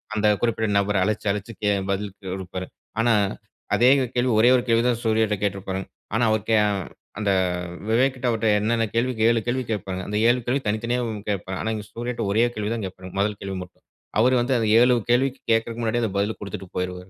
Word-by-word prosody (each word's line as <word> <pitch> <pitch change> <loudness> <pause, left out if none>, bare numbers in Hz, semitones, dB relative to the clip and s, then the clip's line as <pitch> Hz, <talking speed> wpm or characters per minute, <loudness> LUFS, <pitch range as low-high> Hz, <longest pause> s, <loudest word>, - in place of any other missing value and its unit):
அந்த 105 0 +2
குறிப்பிட்ட 110 -2 0
நபர 100 +1 +1
அழைச்சு 105 +1 -2
அழைச்சு 105 +2 -4
கே 105 - +2 0.2
பதில் 100 0 -2 0.2
கொடுப்பாரு. 95 -1 -6 0.3
ஆனா, 115 +1 +4 0.6
அதே 120 +2 +5 0.3
கேள்வி 125 +1 +2
ஒரே 120 +3 +6
ஒரு 125 - +1
கேள்விய 115 0 +3
தான் 120 -2 +1
சூர்யாகிட்ட 110 -2 +2
கேட்ருப்பானுங்க. 95 -1 -2 0.3
ஆனா 115 - +2
அவர் 110 -1 +1
கேய 110 -1 +5 0.6
அந்த 100 -1 0 0.4
வ் 90 - -9
விவேக் 130 +4 +3
கிட்ட 130 -1 -3
அவர்ட்ட 115 -1 0
என்னென்ன 115 +2 +1
கேள்வி 120 +2 +2
கே - - +2
7 115 -1 +3
கேள்வி 130 +2 0
கேட்பாங்க. 95 -3 -3
அந்த 105 - -2
7 125 +1 +3
கேள்வி 130 +3 0
தனித்தனியாவும் 115 0 -1
கேட்பாங் 95 -2 -3
ஆனா 110 - -1
இங்க 105 -1 -6
சூர்யாட்ட 120 +2 -4
ஒரே 110 +3 +3
கேள்வி 105 -1 -2
தான் 115 -2 -3
கேட்பாரு. 95 0 -8
முதல் 105 +1 0
கேள்வி 95 -1 -4
மட்டும். 90 - -18 0.4
அவரு 125 +3 +4
வந்து 125 +2 0
அந்த 115 -2 0
7 125 +1 +5
கேள்விக்கு 130 +2 +2
கேக்க்குறதுக்கு 115 +1 0
முன்னாடியே 115 +1 0
அத 110 - 0
பதில 105 +2 0
குடுத்துட்டு 100 -1 -7
போயிருவாரு. 90 0 -4
110 Hz, 200 wpm, -24 LUFS, 100-120 Hz, 0.6 s, ஒரே